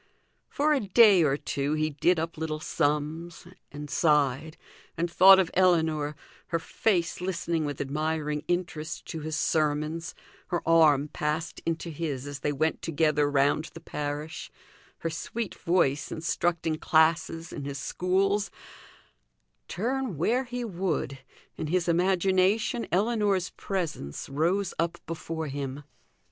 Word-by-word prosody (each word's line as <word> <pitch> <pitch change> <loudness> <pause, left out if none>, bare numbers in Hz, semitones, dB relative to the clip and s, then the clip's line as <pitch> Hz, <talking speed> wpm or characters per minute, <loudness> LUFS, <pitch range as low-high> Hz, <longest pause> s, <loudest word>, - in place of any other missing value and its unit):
For 300 +2 +2
a 290 - +2
day 205 -2 +6
or 140 -2 +2
two 145 0 -2
he 155 0 0
did 170 +4 +2
up 165 +1 -3
little 155 -1 -3
sums, 155 +3 -2 0.3
and 150 0 -7
sighed, 150 0 +1 0.4
and 170 +1 -1
thought 190 +3 +8
of 185 -2 +1
Ellinor, 160 -5 +2 0.3
her 165 - 0
face 175 0 0
listening 170 -3 -1
with 145 -2 -4
admiring 150 +1 -2
interest 160 -3 -3
to 160 - -4
his 155 0 -4
sermons, 155 +2 0 0.3
her 175 -2 -3
arm 155 -4 +5
passed 155 +3 -3
into 165 0 -2
his 145 -4 -4
as 145 -1 -6
they 145 - -1
went 155 +3 0
together 150 -2 +1
round 145 +2 +2
the - - -7
parish; 150 0 -5 0.5
her 165 - -2
sweet 220 +6 -4
voice 150 -6 +1
instructing 165 0 -1
classes 165 +1 +2
in 145 - -6
his 140 -1 -4
schools 195 +7 0 1.2
turn 245 - -2
where 240 - +1
he 245 0 -4
would, 170 -8 -2 0.4
in 155 - -3
his 175 +2 0
imagination 190 +6 +2
Ellinor's 205 -2 +1
presence 165 - -4
rose 170 +7 0
up 170 0 0
before 165 -1 -4
him. 140 0 -5
165 Hz, 130 wpm, -27 LUFS, 150-180 Hz, 1.2 s, thought